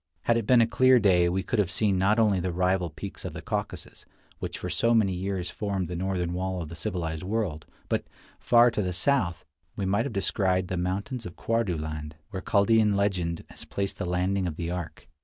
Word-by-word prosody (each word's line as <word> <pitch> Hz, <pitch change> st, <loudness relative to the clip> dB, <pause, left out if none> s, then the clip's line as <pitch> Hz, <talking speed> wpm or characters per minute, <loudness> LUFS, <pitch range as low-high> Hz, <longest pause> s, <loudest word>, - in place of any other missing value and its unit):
Had 120 Hz, -, +2 dB
it 115 Hz, -3 st, -1 dB
been 125 Hz, -2 st, +6 dB
a -, -, +5 dB
clear 130 Hz, +2 st, +5 dB
day 90 Hz, -6 st, +4 dB
we 95 Hz, +2 st, -1 dB
could 120 Hz, -, -1 dB
have 100 Hz, -4 st, +2 dB
seen 100 Hz, -1 st, +1 dB
not 100 Hz, +4 st, +3 dB
only 105 Hz, -4 st, +3 dB
the 90 Hz, +1 st, -1 dB
rival 90 Hz, 0 st, +1 dB
peaks 75 Hz, 0 st, -8 dB
of -, -, -5 dB
the -, -, -7 dB
Caucasus, -, -, -4 dB, 0.4 s
which -, -, -4 dB
for -, -, -5 dB
so 115 Hz, +7 st, +2 dB
many 100 Hz, -4 st, +3 dB
years 90 Hz, -1 st, -3 dB
formed 100 Hz, -4 st, -2 dB
the 90 Hz, -, -5 dB
northern 90 Hz, -1 st, -1 dB
wall 95 Hz, +1 st, -2 dB
of 80 Hz, -3 st, -5 dB
the 85 Hz, -, -8 dB
civilized 80 Hz, -1 st, -3 dB
world, 95 Hz, -7 st, -2 dB, 0.2 s
but, -, -, -1 dB, 0.3 s
far 120 Hz, 0 st, +5 dB
to 110 Hz, -, -1 dB
the 90 Hz, -2 st, -2 dB
south, 95 Hz, -4 st, +1 dB, 0.3 s
we 100 Hz, -, -2 dB
might 100 Hz, +4 st, +1 dB
have -, -, -6 dB
descried 95 Hz, -2 st, +1 dB
the 95 Hz, -, -1 dB
mountains 100 Hz, +7 st, -3 dB
of 90 Hz, -, -10 dB
Quardu 115 Hz, -7 st, 0 dB
land, 75 Hz, 0 st, -5 dB, 0.2 s
where 95 Hz, -, -4 dB
Chaldean 105 Hz, +1 st, +3 dB
legend 95 Hz, -5 st, 0 dB
has -, -, -9 dB
placed 100 Hz, 0 st, -3 dB
the -, -, -2 dB
landing 90 Hz, +1 st, 0 dB
of 80 Hz, -, -4 dB
the 85 Hz, 0 st, -3 dB
ark. 90 Hz, -2 st, -6 dB
95 Hz, 215 wpm, -27 LUFS, 90-105 Hz, 0.4 s, been